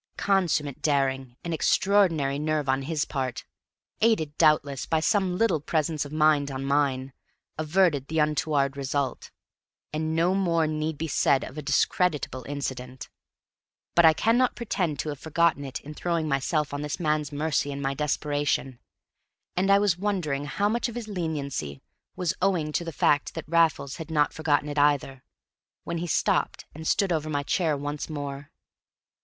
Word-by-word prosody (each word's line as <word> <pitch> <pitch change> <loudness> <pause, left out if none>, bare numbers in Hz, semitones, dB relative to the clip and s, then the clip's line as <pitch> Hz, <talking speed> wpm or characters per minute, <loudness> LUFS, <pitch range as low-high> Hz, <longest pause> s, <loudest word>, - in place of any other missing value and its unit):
Consummate 170 -8 +1
daring 135 -4 0
and 170 - -3
extraordinary 165 -6 +2
nerve 155 -1 -1
on 135 +1 +1
his 150 +1 -1
part, 130 -3 -3 0.6
aided, 185 -10 +2
doubtless, 145 -4 +3
by 160 - +2
some 185 +1 +1
little 210 -7 +2
presence 155 0 -1
of 145 - -9
mind 155 -2 +3
on 135 0 -4
mine, 135 -2 0 0.5
averted 155 -3 +2
the 160 - -3
untoward 150 -2 +1
result; 140 -1 -2 0.6
and 155 +1 -1
no 170 +3 +3
more 170 -4 +2
need 155 0 -2
be 160 - -3
said 135 -2 +2
of 130 - -8
a 155 - -4
discreditable 145 -1 0
incident. 130 -2 -5 0.8
But 170 - +6
I 160 - +8
cannot 235 +8 +2
pretend 185 -10 -2
to 155 - -5
have 145 -2 -5
forgotten 160 -2 +1
it 135 -1 -5
in 150 - -9
throwing 165 0 -1
myself 145 +1 0
on 145 - -3
this 150 -1 -4
man's 150 -3 0
mercy 145 -1 0
in 140 - -5
my 135 0 -1
desperation. 145 -3 -1 0.8
And 190 +2 +1
I 200 - +7
was 200 -4 +1
wondering 175 -9 -1
how 200 +8 0
much 235 +3 0
of 235 - -9
his 240 -3 -5
leniency 145 - -3 0.4
was 180 -3 -1
owing 175 -5 +1
to 170 - -1
the 165 - -5
fact 145 -1 +1
that 165 - -6
Raffles 160 -4 +2
had 160 - -7
not 150 -3 +2
forgotten 150 -2 +1
it 145 0 -2
either, 140 -2 +1 0.6
when 170 0 -3
he 175 - -3
stopped 155 - 0
and 160 +1 -7
stood 195 -3 +2
over 155 -1 -2
my 145 -1 -1
chair 155 0 +1
once 145 +2 -4
more. 145 -2 -5
150 Hz, 165 wpm, -26 LUFS, 140-170 Hz, 0.8 s, I